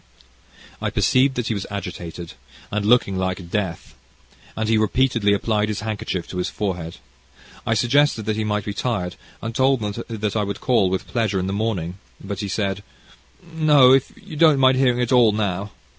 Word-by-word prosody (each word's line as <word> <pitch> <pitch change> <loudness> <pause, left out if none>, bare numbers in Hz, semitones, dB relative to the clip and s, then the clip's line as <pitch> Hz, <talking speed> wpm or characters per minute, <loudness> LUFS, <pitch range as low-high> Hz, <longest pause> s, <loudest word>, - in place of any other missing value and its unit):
I - - 0
perceived 130 +1 +2
that 125 -2 -2
he - - +1
was 100 -2 -4
agitated, 90 -4 -6 0.4
and 105 0 -1
looking 105 -5 +3
like 90 -2 -3
death, 95 -6 -3 0.6
and 110 0 -1
he 115 - +3
repeatedly 110 0 +2
applied 105 +1 +1
his 105 -1 -3
handkerchief 105 -4 -3
to 90 - -6
his 90 - -1
forehead; 90 -5 -4 0.7
I 115 - +2
suggested 120 0 +2
that 110 0 0
he 110 - -1
might 105 -1 -1
be 105 - -3
tired, 100 -7 -2 0.3
and 115 +1 -4
told 130 +2 +3
him 105 -1 -2
that 110 -2 -3
I 105 - +1
would 100 0 -4
call, 115 -7 +2
with 95 0 -2
pleasure, 110 -5 -1
in 90 - -2
the 95 - -2
morning, 100 -4 -2 0.2
but 100 0 -6
he 105 - -3
said: 100 0 -2 0.7
"No, 150 -5 +6
if 135 -1 +2
you 195 -6 -11
don't 155 -2 +5
mind 130 -1 +4
hearing 125 -2 +3
it 120 - -1
all 120 -4 +5
now. 100 -1 -2
105 Hz, 190 wpm, -22 LUFS, 95-125 Hz, 0.7 s, No